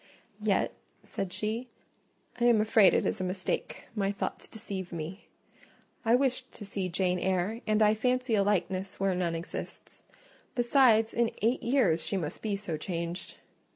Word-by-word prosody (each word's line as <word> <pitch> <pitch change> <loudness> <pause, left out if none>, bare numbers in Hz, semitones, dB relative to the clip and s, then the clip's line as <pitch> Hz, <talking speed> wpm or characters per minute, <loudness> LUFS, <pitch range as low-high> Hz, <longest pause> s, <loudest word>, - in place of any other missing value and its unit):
"Yet," - - +1 0.3
said 195 -2 -4
she, 225 +5 -3 0.7
"I 240 - +2
am 235 -2 +6
afraid 215 -2 +5
it - - +2
is - - -1
a - - 0
mistake: 185 +1 -3
my 200 -2 +1
thoughts 200 - -4
deceive 200 -5 -6
me. 170 +4 -6 0.8
I 230 0 +4
wished 260 -1 0
to 210 - -9
see 195 -2 -3
Jane 180 0 0
Eyre, 190 +5 0
and 215 0 +4
I 210 0 +5
fancy 250 +2 0
a 205 - +4
likeness 190 -1 -1
where 195 -1 +2
none 175 -2 -1
exists: 165 +1 -7 0.5
besides, 240 -3 +4
in 235 -1 +2
eight 235 +4 +2
years 235 - +2
she 200 - -1
must 155 -5 -4
be 210 -2 -1
so 195 -6 -4
changed." 170 +2 -4
200 Hz, 160 wpm, -30 LUFS, 185-230 Hz, 0.8 s, am